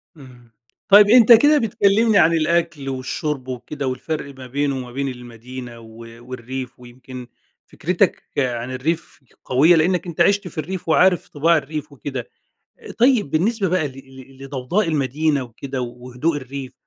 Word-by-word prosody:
اهم، 125 -5 -16 0.4
طيب 205 +1 +8
أنت 240 0 +7
كده 290 +7 +7
بتكلمني 220 -2 +2
عن 170 -1 +5
الأكل 165 -3 0
والشرب 135 +1 -4
وكده، 130 +2 -5
والفرق 140 +2 -4
ما 130 - -10
بينه 140 +1 -1
وما 125 -1 -7
بين 140 +2 -3
المدينة 125 -1 -9
و 115 - -14 0.4
والريف 130 0 -7
ويمكن 125 0 -11 0.4
فكرتك - - -1
عن 125 -2 -1
الريف 155 +6 -3 0.3
قوية؛ 145 +7 +4
لأنك 180 +3 +1
أنت 170 0 -3
عِشت 200 +2 +3
في 170 - -12
الريف، 170 +3 -5
وعارف 180 +2 +3
طباع 165 +3 +2
الريف 150 +1 -5
وكده، 135 -3 -6 0.7
طيب 240 - +3
بالنسبة 195 +5 0
بقى 170 -4 0
ل - - -12 0.5
ل - - -8
لضوضاء 140 +8 -2
المدينة 145 0 0
وكده 130 +2 -6
وهدوء 125 +6 -3
الريف، 135 -1 -7
140 Hz, 145 wpm, -20 LUFS, 130-170 Hz, 0.7 s, طيب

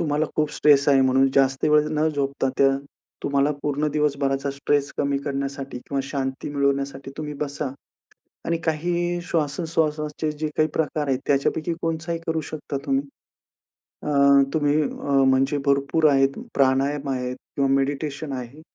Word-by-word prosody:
तुम्हाला 155 -1 0
खूप 150 -1 +1
स्ट्रेस 145 -1 +4
आहे. 135 -2 +5
म्हणून 135 +1 +4
जास्त 135 -1 +3
वेळ 150 0 +4
न 155 +1 +3
झोपता, 140 -2 -1
त्या 135 - +6 0.5
तुम्हाला 140 +1 +2
पूर्ण 150 +1 0
दिवसभराचा 140 -2 0
स्ट्रेस 140 +1 0
कमी 140 -1 +1
करण्यासाठी 140 -1 -4
किंवा 135 +2 -3
शांती 135 -1 -3
मिळवण्यासाठी, 140 -1 -1
तुम्ही 150 -1 -5
बसा 145 -1 -3 0.8
आणि 170 - +1
काही 175 +2 0
श्वासोच्छ्वासाचे 155 -1 -1
जे 155 +1 -3
काही 155 0 +3
प्रकार 150 -2 -1
आहेत, 130 -1 +1
त्याच्यापैकी 155 +4 +1
कोणचाही 165 0 -2
करू 160 -1 0
शकता 145 -2 -5
तुम्ही. 270 0 +1 1.0
अ, 150 - -3 0.4
तुम्ही 150 -1 +2
अ, 140 -1 0
म्हणजे 135 +2 +2
भरपूर 140 +3 +2
आहेत 135 0 +2 0.2
प्राणायाम 140 +1 +2
आहेत 125 -1 -2 0.2
किंवा 140 -1 +2
मेडिटेशन 140 +1 -2
आहे. 130 +3 -7
145 Hz, 140 wpm, -23 LUFS, 135-155 Hz, 1.0 s, त्या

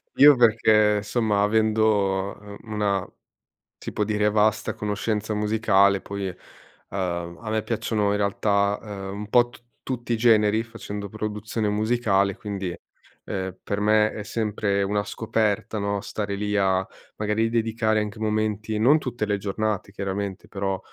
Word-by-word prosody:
io, 145 +1 +8
perché, 110 -3 +4
somma, 105 -1 0
avendo 105 -2 +1
una, 105 -4 -1 0.7
si - - -7
può - - -1
dire, 105 0 +1
vasta 105 0 +1
conoscenza 105 +1 -2
musicale, 105 -2 +3
poi, 100 0 -5
uhm, 85 -1 -6
a 110 -2 -6
me 110 0 0
piacciono, 105 -2 -1
in 100 - +1
realtà, 100 0 +1
uhm, 100 -3 -6
un 105 0 -6
po' 120 +2 +4
t 120 - -16 0.3
tutti 120 -2 -3
i - - +2
generi, 110 -1 +4
facendo 105 -3 -7
produzione 110 +1 -3
musicale, 105 -3 +1
quindi, 100 -4 -4 0.5
ehm, 95 -1 -4
per 100 0 -3
me 105 +1 +3
è 105 - -6
sempre 105 -2 -1
una 105 +1 0
scoperta, 110 -1 -1
no, 100 0 -1
stare 105 -3 -3
lì 105 +1 -2
a, 95 -1 +2 0.3
magari, 110 +2 0
dedicare 110 -1 +1
anche 105 0 -4
momenti, 110 0 -1
non 130 +8 +5
tutte 120 -6 -3
le 105 -1 0
giornate, 105 +1 -2
chiaramente, 100 -1 -4
però, 95 -1 -2
105 Hz, 145 wpm, -24 LUFS, 100-110 Hz, 0.7 s, io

